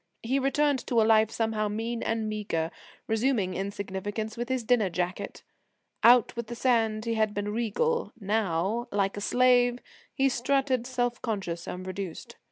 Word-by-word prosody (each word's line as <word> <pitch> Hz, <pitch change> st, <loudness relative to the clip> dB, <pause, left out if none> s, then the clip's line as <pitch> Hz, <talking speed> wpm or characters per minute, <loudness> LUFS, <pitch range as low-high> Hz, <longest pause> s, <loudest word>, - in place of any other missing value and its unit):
He 260 Hz, +4 st, +1 dB
returned 280 Hz, +1 st, +2 dB
to 235 Hz, -, +2 dB
a 220 Hz, -, +5 dB
life 220 Hz, -1 st, +5 dB
somehow 220 Hz, -2 st, -1 dB
mean 225 Hz, +3 st, -3 dB
and 225 Hz, -1 st, -1 dB
meagre, 200 Hz, -7 st, -2 dB, 0.3 s
resuming 220 Hz, -4 st, +1 dB
insignificance 200 Hz, +3 st, -4 dB
with 240 Hz, +1 st, -4 dB
his 260 Hz, -2 st, 0 dB
dinner 225 Hz, -4 st, +3 dB
jacket. 180 Hz, +2 st, -4 dB, 0.6 s
Out 240 Hz, 0 st, +6 dB
with 235 Hz, -1 st, -4 dB
the 240 Hz, -, -6 dB
sand 225 Hz, -3 st, +1 dB
he 230 Hz, -, 0 dB
had 215 Hz, -2 st, +1 dB
been 205 Hz, 0 st, -2 dB
regal; 355 Hz, -, 0 dB
now, 205 Hz, +1 st, 0 dB
like 195 Hz, -1 st, 0 dB
a 205 Hz, -, -5 dB
slave, 245 Hz, +1 st, +4 dB, 0.3 s
he 270 Hz, -, +2 dB
strutted 260 Hz, -1 st, +1 dB
self 245 Hz, -2 st, -1 dB
conscious 190 Hz, -7 st, -3 dB
and 180 Hz, +1 st, -5 dB
reduced. 185 Hz, -2 st, -6 dB
225 Hz, 160 wpm, -28 LUFS, 200-245 Hz, 0.6 s, Out